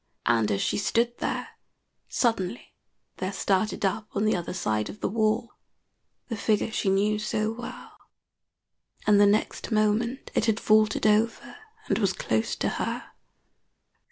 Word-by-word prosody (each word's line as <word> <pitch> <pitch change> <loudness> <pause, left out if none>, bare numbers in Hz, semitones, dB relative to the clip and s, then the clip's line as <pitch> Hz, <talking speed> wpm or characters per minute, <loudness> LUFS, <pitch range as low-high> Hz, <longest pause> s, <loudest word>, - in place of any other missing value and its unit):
And 115 -3 +3
as 100 - 0
she - - 0
stood 235 +3 0
there, - - -2 0.6
suddenly 225 -3 -1 0.4
there 185 +1 -2
started 200 +2 0
up 210 +3 -1
on 205 +1 0
the 215 - +3
other 175 - -3
side 110 -12 -1
of 210 - -9
the - - -1
wall 220 +2 0 0.7
the 230 - -3
figure 215 +1 0
she 200 - 0
knew 205 +2 +2
so 215 0 -1
well, 235 +1 -9 1.1
and 205 -1 +5
the 205 - +7
next 210 +3 0
moment 220 +4 +1
it - - +2
had 220 0 +2
vaulted 215 -1 +3
over 215 +2 +2 0.3
and - - +1
was 195 -4 +2
close 110 -8 -1
to - - -1
her. - - -4
215 Hz, 150 wpm, -27 LUFS, 195-220 Hz, 1.1 s, the